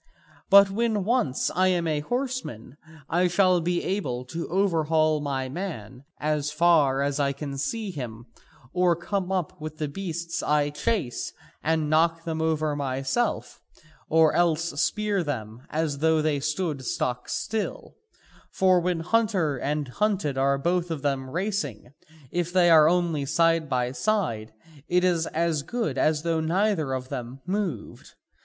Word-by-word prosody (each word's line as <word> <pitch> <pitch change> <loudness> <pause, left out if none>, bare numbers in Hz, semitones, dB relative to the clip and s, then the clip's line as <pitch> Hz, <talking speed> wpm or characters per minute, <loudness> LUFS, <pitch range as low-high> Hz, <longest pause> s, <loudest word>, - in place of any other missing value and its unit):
But 200 0 +8
when 220 -1 0
once 205 - +1
I 185 +2 +3
am 175 -2 +1
a 155 -2 0
horseman 245 - -4 0.3
I 175 +3 +2
shall 180 0 +3
be 175 +1 -1
able 130 -11 -2
to 165 +7 -5
overhaul 160 -4 +2
my 135 -2 -2
man 130 - -6
as 150 -1 -1
far 150 -4 +3
as 140 +1 -1
I 140 -1 +1
can 140 0 -6
see 200 +10 -3
him, 120 -7 -7 0.5
or 180 -1 +3
come 185 +2 -3
up 180 -5 -2
with 155 0 -6
the 150 - -2
beasts 170 +1 -4
I 145 -1 +1
chase 145 - -2 0.3
and 160 -1 +1
knock 165 +2 +2
them 160 -1 -3
over 155 -2 0
myself 135 - -2 0.5
or 160 -1 +5
else 165 -3 +1
spear 210 -2 0
them 120 -4 -5
as 155 -3 -1
though 160 +1 +3
they 155 -2 +1
stood 150 -1 -2
stock 125 0 -2
still, 220 -1 -3 0.5
for 185 -1 +3
when 175 -1 -1
hunter 185 -7 +1
and 145 +2 -2
hunted 195 -1 0
are 135 +1 +2
both 175 +4 0
of 155 -4 -4
them 135 -2 -1
racing, 155 - -3 0.4
if 175 0 -1
they 175 -2 +4
are 155 -1 +7
only 170 -4 +1
side 165 +2 +2
by 125 -2 0
side, 125 - -1 0.4
it 180 +1 +2
is 175 -3 +2
as 165 -2 0
good 165 - -2
as 155 0 +2
though 165 -1 0
neither 165 -2 +1
of 130 0 -4
them 130 -1 -6
moved. 185 - -4
160 Hz, 150 wpm, -26 LUFS, 140-180 Hz, 0.5 s, But